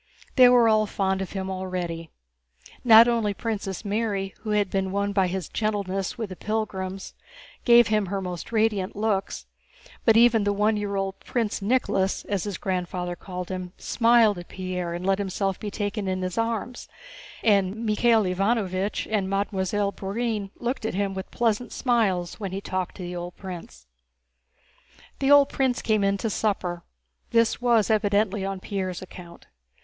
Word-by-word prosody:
They 255 Hz, -2 st, +8 dB
were 245 Hz, -2 st, +6 dB
all 215 Hz, -1 st, +3 dB
fond 190 Hz, -1 st, -1 dB
of 190 Hz, -, -5 dB
him 190 Hz, -1 st, -3 dB
already. 180 Hz, -3 st, -4 dB, 0.7 s
Not 230 Hz, -1 st, +8 dB
only 225 Hz, -4 st, +1 dB
Princess 210 Hz, -3 st, -4 dB
Mary, 200 Hz, -2 st, -1 dB
who 215 Hz, -, -6 dB
had 210 Hz, -2 st, +1 dB
been 190 Hz, -1 st, -1 dB
won 200 Hz, +1 st, -1 dB
by 190 Hz, -2 st, +3 dB
his 180 Hz, -2 st, -3 dB
gentleness 200 Hz, -2 st, -2 dB
with 220 Hz, -4 st, -4 dB
the 185 Hz, -, -7 dB
pilgrims, 195 Hz, -3 st, -4 dB, 0.5 s
gave 240 Hz, -2 st, +7 dB
him 210 Hz, -2 st, +1 dB
her 195 Hz, +2 st, -2 dB
most 180 Hz, 0 st, -6 dB
radiant 215 Hz, -4 st, +1 dB
looks, 205 Hz, -2 st, -1 dB, 0.6 s
but 225 Hz, -1 st, +5 dB
even 230 Hz, -2 st, +5 dB
the 205 Hz, 0 st, +1 dB
one 210 Hz, +2 st, +2 dB
year 205 Hz, -1 st, -2 dB
old 195 Hz, 0 st, -2 dB
"Prince 225 Hz, -4 st, -2 dB
Nicholas" 200 Hz, -3 st, 0 dB
(as 200 Hz, -2 st, -2 dB
his 200 Hz, -4 st, -4 dB
grandfather 180 Hz, -1 st, -3 dB
called 180 Hz, -1 st, -7 dB
him) 185 Hz, -1 st, -5 dB
smiled 230 Hz, -4 st, +3 dB
at 175 Hz, -, -10 dB
Pierre 180 Hz, -2 st, -4 dB
and 175 Hz, +1 st, -5 dB
let 195 Hz, 0 st, +2 dB
himself 195 Hz, -1 st, -2 dB
be 210 Hz, -, -4 dB
taken 205 Hz, 0 st, -3 dB
in 185 Hz, 0 st, -1 dB
his 185 Hz, -1 st, -3 dB
arms, 230 Hz, +2 st, -2 dB, 0.6 s
and 205 Hz, +1 st, +2 dB
Michael 225 Hz, +1 st, +3 dB
Ivánovich 195 Hz, 0 st, 0 dB
and 205 Hz, -3 st, -1 dB
Mademoiselle 200 Hz, 0 st, 0 dB
Bourienne 205 Hz, +1 st, -3 dB
looked 245 Hz, +1 st, -3 dB
at 220 Hz, -, -2 dB
him 200 Hz, 0 st, -1 dB
with 190 Hz, 0 st, -6 dB
pleasant 235 Hz, 0 st, 0 dB
smiles 200 Hz, -9 st, 0 dB
when 195 Hz, -3 st, -4 dB
he 190 Hz, -, -3 dB
talked 185 Hz, -2 st, -3 dB
to 185 Hz, -, -7 dB
the 175 Hz, 0 st, -5 dB
old 175 Hz, 0 st, -6 dB
prince. 170 Hz, -, -9 dB, 1.3 s
The 270 Hz, -, +1 dB
old 285 Hz, -1 st, +7 dB
prince 260 Hz, -2 st, 0 dB
came 215 Hz, -2 st, +2 dB
in 200 Hz, 0 st, +2 dB
to 225 Hz, -, -2 dB
supper; 185 Hz, -5 st, -1 dB, 0.5 s
this 230 Hz, 0 st, +2 dB
was 230 Hz, -4 st, +3 dB
evidently 205 Hz, -1 st, +1 dB
on 195 Hz, 0 st, -3 dB
Pierre's 185 Hz, -2 st, -4 dB
account. 180 Hz, -2 st, -12 dB
200 Hz, 165 wpm, -25 LUFS, 185-220 Hz, 1.3 s, They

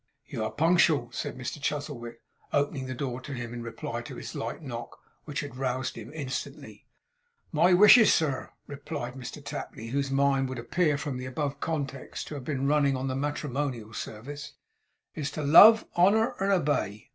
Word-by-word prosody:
'You -, -, -4 dB
are 110 Hz, -, -2 dB
punctual,' 160 Hz, -6 st, +3 dB
said 120 Hz, -, -4 dB
Mr 130 Hz, +3 st, -5 dB
Chuzzlewit, 140 Hz, -6 st, -4 dB, 0.3 s
opening 140 Hz, -2 st, 0 dB
the 130 Hz, -, -4 dB
door 130 Hz, -1 st, -4 dB
to 140 Hz, -, -7 dB
him 120 Hz, -2 st, -5 dB
in 120 Hz, -, -5 dB
reply 115 Hz, 0 st, -5 dB
to -, -, -9 dB
his -, -, -7 dB
light -, -, -5 dB
knock, -, -, -7 dB, 0.3 s
which 150 Hz, +2 st, -3 dB
had 145 Hz, -3 st, -8 dB
roused 130 Hz, 0 st, -2 dB
him 115 Hz, +2 st, -9 dB
instantly. 140 Hz, -4 st, -6 dB, 0.6 s
'My 175 Hz, +3 st, +4 dB
wishes, 210 Hz, +5 st, +8 dB
sir,' 145 Hz, -5 st, 0 dB, 0.2 s
replied 140 Hz, -3 st, -6 dB
Mr 130 Hz, -2 st, -8 dB
Tapley, 115 Hz, +1 st, -6 dB
whose 140 Hz, +2 st, -1 dB
mind 135 Hz, -1 st, +2 dB
would 130 Hz, -, -5 dB
appear 150 Hz, +6 st, +1 dB
from 140 Hz, -2 st, -4 dB
the 130 Hz, 0 st, -6 dB, 0.3 s
context 140 Hz, -5 st, -4 dB
to -, -, -6 dB
have 140 Hz, -3 st, -6 dB
been 135 Hz, 0 st, -2 dB
running 145 Hz, -2 st, +3 dB
on 130 Hz, +1 st, -2 dB
the 130 Hz, -, -2 dB
matrimonial 135 Hz, -5 st, -3 dB
service, 145 Hz, +9 st, -7 dB, 0.6 s
'is 145 Hz, -3 st, -3 dB
to 150 Hz, -, -5 dB
love, 210 Hz, +10 st, +9 dB
honour, 205 Hz, +6 st, +4 dB
and 195 Hz, +1 st, +1 dB
obey. 140 Hz, -, 0 dB
140 Hz, 170 wpm, -28 LUFS, 125-150 Hz, 0.6 s, love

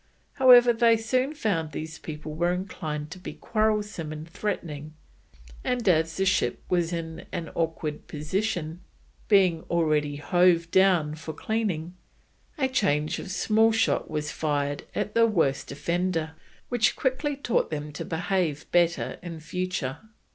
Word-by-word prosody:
However, 245 Hz, -2 st, +7 dB
they 230 Hz, 0 st, +4 dB
soon 255 Hz, +6 st, 0 dB
found 165 Hz, -, -1 dB
these 160 Hz, +1 st, -6 dB
people 155 Hz, 0 st, -7 dB
were 175 Hz, +3 st, +1 dB
inclined 155 Hz, -5 st, -4 dB
to 185 Hz, -, -8 dB
be 180 Hz, -, -7 dB
quarrelsome 210 Hz, -7 st, -1 dB
and 155 Hz, +1 st, -7 dB
threatening, 155 Hz, -5 st, -4 dB, 0.7 s
and 245 Hz, -3 st, -1 dB
as 160 Hz, -2 st, +3 dB
the 190 Hz, -, +1 dB
ship 185 Hz, -10 st, +1 dB
was 175 Hz, -2 st, +1 dB
in 165 Hz, -1 st, -5 dB
an 165 Hz, -3 st, -4 dB
awkward 160 Hz, -2 st, -3 dB
position, 170 Hz, +1 st, -2 dB, 0.5 s
being 185 Hz, -6 st, +4 dB
already 155 Hz, -3 st, +1 dB
hove 170 Hz, +2 st, +3 dB
down 180 Hz, -6 st, +4 dB
for 160 Hz, 0 st, -7 dB
cleaning, 180 Hz, -4 st, -2 dB, 0.6 s
a 265 Hz, -3 st, +2 dB
charge 155 Hz, -, +1 dB
of -, -, -7 dB
small 220 Hz, +4 st, +3 dB
shot 225 Hz, 0 st, +1 dB
was 150 Hz, -1 st, -3 dB
fired 145 Hz, -2 st, -1 dB
at 210 Hz, 0 st, -2 dB
the 230 Hz, 0 st, +5 dB
worst 160 Hz, -10 st, 0 dB
offender, 165 Hz, +2 st, -1 dB, 0.4 s
which 240 Hz, -3 st, +2 dB
quickly 280 Hz, +2 st, -1 dB
taught 270 Hz, -4 st, 0 dB
them 150 Hz, -1 st, -4 dB
to 150 Hz, -, -6 dB
behave 165 Hz, -3 st, -1 dB
better 170 Hz, -1 st, +1 dB
in 170 Hz, -2 st, -7 dB
future. 165 Hz, -4 st, -3 dB
170 Hz, 140 wpm, -26 LUFS, 155-210 Hz, 0.7 s, However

